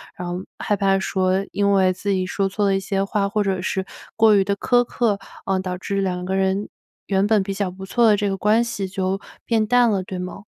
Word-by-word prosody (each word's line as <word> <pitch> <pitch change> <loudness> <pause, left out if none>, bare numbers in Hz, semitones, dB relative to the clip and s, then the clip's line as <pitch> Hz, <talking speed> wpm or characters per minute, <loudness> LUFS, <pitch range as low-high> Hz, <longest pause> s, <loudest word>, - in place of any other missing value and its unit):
然 180 - -6
后 175 +1 -4
害 205 - 0
怕 195 -1 +2
说 190 0 0
因 200 0 +2
为 190 -1 +3
自 200 +3 -5
己 185 -1 0
说 195 +1 -1
错 205 +1 -1
了 195 - +2
一 - - +1
些 195 0 -1
话， 200 0 0
或 210 0 0
者 190 -2 -1
是 190 +1 -2 0.3
过 220 -1 +5
于 195 - +4
地 200 +1 -1
苛 245 +4 +2
刻， 230 -4 0 0.3
嗯， 190 -1 0
导 185 -1 -4
致 195 +1 -2
2 180 -2 -2
个 190 +1 -1
人 190 +1 0 0.4
原 195 0 +2
本 215 -1 +3
比 195 0 -4
较 195 -1 -2
不 190 +1 -9
错 235 +4 +3
的 210 - +6
这 205 0 0
个 195 - -1
关 215 +4 +3
系， 200 -5 -3
就 190 0 -2 0.3
变 225 -2 +2
淡 245 +1 +4
了， 195 -2 0
对 185 0 -6
吗？ 180 +2 -7
195 Hz, 255 characters per minute, -22 LUFS, 190-205 Hz, 0.4 s, 的